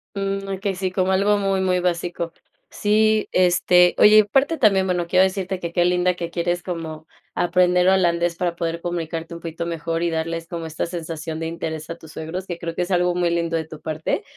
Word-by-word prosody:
Mm 195 0 -2
okey, 195 0 -3
sí, 185 0 -2
como 185 0 0
algo 200 +2 +3
muy, 195 -1 0
muy 185 -1 +1
básico. 175 -1 -2 0.4
Sí, 215 +1 +2
este, 180 0 +4
oye, 210 +1 +7
y - - +10
a - - -4
parte 270 +9 +1
también, 195 -6 +4
bueno, 175 -2 -1
quiero 185 +2 +4
decirte 190 0 -1
que, 170 -2 -5
qué 175 0 +2
linda 180 0 +2
que 170 -1 -5
quieres 175 +1 -1
como, 160 -3 -6 0.3
aprender 180 0 +2
holandés 175 -2 +2
para 175 -1 -2
poder 170 -1 -3
comunicarte 165 -1 -4
un - - -8
poquito 165 0 -5
mejor 165 0 -3
y 170 - +1
darles 165 0 -3
como 170 -1 -5
esta 160 0 -3
sensación 165 -2 -5
de 165 - -3
interés 160 -1 -5
a 165 - -4
tus 160 -2 -14
suegros, 175 +4 -5
que 175 - -4
creo 165 -1 -5
que - - -1
es 180 +2 -3
algo 180 -1 +2
muy 175 -1 +1
lindo 170 -1 -1
de 160 -1 -1
tu 155 -1 -10
parte. 155 - -2
175 Hz, 215 wpm, -22 LUFS, 165-185 Hz, 0.4 s, y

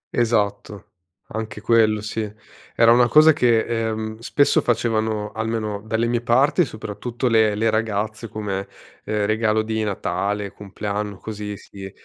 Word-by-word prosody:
Esatto. 105 -3 -1 0.4
Anche 110 -1 -5
quello 110 -2 +3
sì. 110 0 -4 0.4
Era 115 0 +6
una 120 0 +5
cosa 155 +5 +7
che, 120 -6 +3
ehm, 110 -1 -3
spesso 140 +4 +2
facevano, 110 -2 0
almeno 110 -2 -3
dalle 110 +1 -1
mie 120 0 0
parti, 135 +8 +3
soprattutto 115 +2 -4
le 110 -3 +3
le 110 +1 +1
ragazze 110 +1 -2
come, 100 -2 -4 0.4
ehm, 105 -1 0
regalo 110 0 +1
di 110 0 -2
Natale, 100 0 -2
compleanno, 105 0 -5
così 105 -1 -6
si 95 -1 -10
110 Hz, 135 wpm, -22 LUFS, 105-115 Hz, 0.4 s, cosa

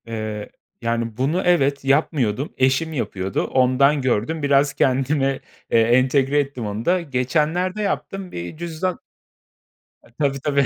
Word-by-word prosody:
Eee, 110 -2 -5 0.3
yani, 115 -1 -2
bunu 145 +8 +1
evet, 140 -6 +2
yapmıyordum. 135 -3 +1
Eşim 135 +5 +1
yapıyordu. 100 -7 -2
Ondan 135 +3 +3
gördüm. 130 +5 -1
Biraz 140 0 +3
kendime, 135 +1 +1 0.3
eee, 115 - +5
entegre 130 +4 +3
ettim 135 -5 -3
onu 105 +2 -4
da. 180 +1 +2
Geçenlerde 160 +7 0
yaptım 195 -2 -3
bir 85 - -6
cüzdan 170 +2 -3 1.0
E, - - -20
tabii, 140 -2 0
tabii, 140 -1 +2
135 Hz, 130 wpm, -21 LUFS, 120-155 Hz, 1.0 s, eee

